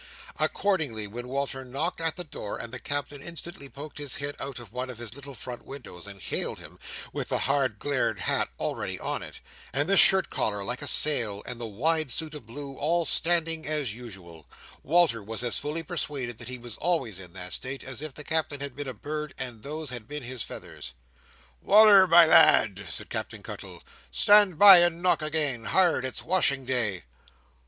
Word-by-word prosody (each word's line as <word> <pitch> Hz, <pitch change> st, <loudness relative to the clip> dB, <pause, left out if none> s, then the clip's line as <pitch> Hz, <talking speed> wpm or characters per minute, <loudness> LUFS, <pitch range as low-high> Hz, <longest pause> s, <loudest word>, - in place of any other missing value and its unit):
Accordingly, 150 Hz, -, 0 dB
when 120 Hz, +4 st, -7 dB
Walter 135 Hz, 0 st, -3 dB
knocked 135 Hz, +6 st, -3 dB
at 165 Hz, -1 st, 0 dB
the 180 Hz, -, -6 dB
door, 145 Hz, -10 st, -6 dB
and 115 Hz, +1 st, -8 dB
the 130 Hz, -, -5 dB
Captain 145 Hz, +1 st, -4 dB
instantly 170 Hz, -3 st, -8 dB
poked 145 Hz, +2 st, -9 dB
his 145 Hz, -3 st, -1 dB
head 145 Hz, 0 st, -4 dB
out 135 Hz, -1 st, -5 dB
of 120 Hz, -4 st, -11 dB
one 125 Hz, +1 st, -4 dB
of 125 Hz, -, -7 dB
his 115 Hz, -2 st, -8 dB
little 140 Hz, 0 st, -10 dB
front 120 Hz, 0 st, -8 dB
windows, 115 Hz, -9 st, -9 dB
and 100 Hz, -1 st, -9 dB
hailed -, -, -2 dB
him, -, -, -10 dB, 0.3 s
with -, -, -4 dB
the -, -, +1 dB
hard 135 Hz, -5 st, 0 dB
glared 120 Hz, -7 st, -1 dB
hat -, -, 0 dB
already -, -, -3 dB
on -, -, -2 dB
it, -, -, -10 dB, 0.3 s
and 145 Hz, +4 st, 0 dB
the 195 Hz, -, +3 dB
shirt 190 Hz, -1 st, +5 dB
collar 105 Hz, -2 st, -1 dB
like 125 Hz, +4 st, -3 dB
a 145 Hz, -, -2 dB
sail, 115 Hz, -12 st, +3 dB
and 120 Hz, -1 st, -6 dB
the 115 Hz, -, -4 dB
wide 155 Hz, +8 st, 0 dB
suit 155 Hz, +4 st, 0 dB
of 145 Hz, -7 st, -10 dB
blue, 140 Hz, +3 st, -8 dB
all 165 Hz, +3 st, +1 dB
standing 165 Hz, -1 st, +2 dB
as 150 Hz, -7 st, 0 dB
usual, 95 Hz, -9 st, -11 dB, 0.3 s
Walter 160 Hz, -7 st, +3 dB
was 110 Hz, +4 st, -3 dB
as 120 Hz, -, +2 dB
fully 155 Hz, +3 st, -3 dB
persuaded 145 Hz, -9 st, -4 dB
that 115 Hz, -, -9 dB
he 125 Hz, -, -5 dB
was 120 Hz, -2 st, -9 dB
always 140 Hz, -, -1 dB
in 90 Hz, -2 st, -11 dB
that 90 Hz, -1 st, -6 dB
state, 135 Hz, +1 st, -4 dB
as 130 Hz, 0 st, -6 dB
if 155 Hz, -1 st, -4 dB
the 150 Hz, -, -11 dB
Captain 155 Hz, -2 st, -1 dB
had 140 Hz, -2 st, -5 dB
been 145 Hz, 0 st, -5 dB
a 130 Hz, -, -7 dB
bird 150 Hz, +6 st, -5 dB
and 120 Hz, -4 st, -6 dB
those 150 Hz, +1 st, -6 dB
had 120 Hz, -4 st, -5 dB
been 150 Hz, -1 st, -5 dB
his 125 Hz, -1 st, -4 dB
feathers. -, -, -8 dB, 0.7 s
"Wal"r, 205 Hz, -2 st, +7 dB
my 170 Hz, 0 st, +8 dB
lad!" 105 Hz, -, +5 dB
said 80 Hz, -, -5 dB
Captain -, -, -4 dB
Cuttle. -, -, -9 dB, 0.3 s
"Stand 205 Hz, -5 st, +5 dB
by 195 Hz, -1 st, +10 dB
and 175 Hz, 0 st, +2 dB
knock 170 Hz, -4 st, +3 dB
again. 150 Hz, -7 st, -1 dB
Hard! 170 Hz, -2 st, +2 dB
It's 130 Hz, -, -4 dB
washing 140 Hz, -7 st, +2 dB
day." 115 Hz, -8 st, -1 dB
140 Hz, 195 wpm, -27 LUFS, 120-160 Hz, 0.7 s, by